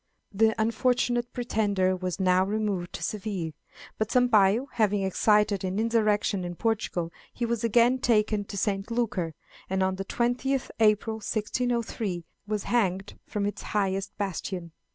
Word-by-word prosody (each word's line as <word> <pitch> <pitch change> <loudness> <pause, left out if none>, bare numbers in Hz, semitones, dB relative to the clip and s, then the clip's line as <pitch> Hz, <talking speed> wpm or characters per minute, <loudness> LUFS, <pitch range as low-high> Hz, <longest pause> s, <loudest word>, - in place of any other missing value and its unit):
The 220 +2 +2
unfortunate 240 +1 +1
pretender 205 -6 +1
was 185 0 -4
now 185 0 +4
removed 200 -3 -1
to - - -5
Seville, 195 -6 -3 0.5
but 220 0 0
Sampayo 240 -1 +4
having 210 -4 +1
excited 210 +1 +2
an 185 +1 -2
insurrection 215 -3 +1
in 175 0 -5
Portugal, 185 -6 -1 0.2
he 240 - -2
was 235 -1 -1
again 235 +3 +4
taken 215 -4 +2
to 200 - -7
St. 195 +1 -1
Lucar, 205 -9 -1 0.3
and 190 0 +1
on 190 0 0
the 195 - -4
20th 250 +4 0
April, 220 0 +3
1603, 220 -4 -2 0.2
was 210 -1 -2
hanged 195 -4 0
from 205 -1 -2
its 205 - -3 0.2
highest 195 -1 -1
bastion. 185 -3 -4
210 Hz, 140 wpm, -27 LUFS, 190-230 Hz, 0.5 s, now